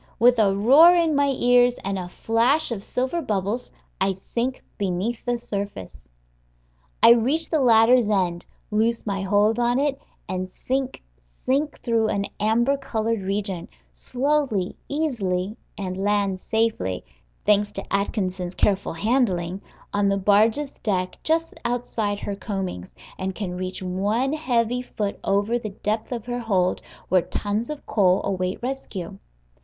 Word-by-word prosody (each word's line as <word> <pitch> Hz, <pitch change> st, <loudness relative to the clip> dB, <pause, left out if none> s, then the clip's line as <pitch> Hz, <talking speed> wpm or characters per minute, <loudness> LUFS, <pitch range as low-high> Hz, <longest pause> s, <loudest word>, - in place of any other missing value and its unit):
With 245 Hz, 0 st, +5 dB
a 195 Hz, -3 st, +4 dB
roar 280 Hz, -, +7 dB
in 335 Hz, -3 st, +3 dB
my 285 Hz, 0 st, +3 dB
ears, 245 Hz, -1 st, +4 dB
and 195 Hz, 0 st, -2 dB
a 180 Hz, -1 st, -6 dB
flash 235 Hz, -, +1 dB
of 205 Hz, -4 st, -4 dB
silver 260 Hz, +10 st, -1 dB
bubbles, 215 Hz, -, -2 dB, 0.3 s
I 195 Hz, 0 st, +2 dB
sink 235 Hz, +7 st, -3 dB, 0.2 s
beneath 200 Hz, +4 st, -2 dB
the 245 Hz, -1 st, 0 dB
surface; 200 Hz, -, -6 dB, 0.9 s
I -, -, +10 dB
reach 265 Hz, +8 st, +2 dB
the 315 Hz, -3 st, +2 dB
ladder's 230 Hz, -1 st, +5 dB
end, 180 Hz, -4 st, 0 dB, 0.2 s
loose 225 Hz, +2 st, +1 dB
my 200 Hz, -2 st, -2 dB
hold 205 Hz, +4 st, +2 dB
on 240 Hz, +1 st, +2 dB
it, 280 Hz, -1 st, 0 dB, 0.3 s
and 185 Hz, 0 st, -3 dB
sink, 265 Hz, +6 st, -3 dB, 0.2 s
sink 265 Hz, -, -2 dB
through 230 Hz, -2 st, +1 dB
an 200 Hz, -2 st, -1 dB
amber 235 Hz, +6 st, +2 dB
colored 225 Hz, -5 st, -2 dB
region, 195 Hz, -2 st, -3 dB, 0.3 s
slowly, 255 Hz, -7 st, 0 dB
easily, 215 Hz, -10 st, -1 dB, 0.2 s
and 185 Hz, -2 st, -4 dB
land 200 Hz, -2 st, +1 dB
safely 220 Hz, -, -1 dB, 0.4 s
(thanks 205 Hz, 0 st, +3 dB
to -, -, -5 dB
Atkinson's 185 Hz, -3 st, -1 dB
careful 195 Hz, -3 st, +1 dB
handling) 190 Hz, -3 st, 0 dB, 0.3 s
on 205 Hz, -1 st, +2 dB
the 195 Hz, -, +1 dB
barge's 215 Hz, +8 st, +2 dB
deck 185 Hz, -4 st, -1 dB
just 325 Hz, +1 st, 0 dB
outside 230 Hz, -4 st, -1 dB
her 200 Hz, -, -3 dB
combings, 190 Hz, -, -5 dB, 0.3 s
and 190 Hz, 0 st, -3 dB
can 185 Hz, -4 st, -4 dB
reach 185 Hz, +1 st, -4 dB
one 205 Hz, +9 st, 0 dB
heavy 250 Hz, -5 st, 0 dB
foot 210 Hz, -5 st, -4 dB
over 205 Hz, +4 st, +1 dB
the 215 Hz, -, -5 dB
depth 215 Hz, +3 st, -3 dB
of 235 Hz, -3 st, -4 dB
her 245 Hz, 0 st, -3 dB
hold, 190 Hz, -6 st, +1 dB, 0.3 s
where 185 Hz, -1 st, +4 dB
tons 210 Hz, +6 st, -3 dB
of 300 Hz, -1 st, -6 dB
coal 190 Hz, -3 st, +3 dB
await 185 Hz, +1 st, -2 dB
rescue. 200 Hz, -8 st, -5 dB
215 Hz, 145 wpm, -24 LUFS, 195-245 Hz, 0.9 s, I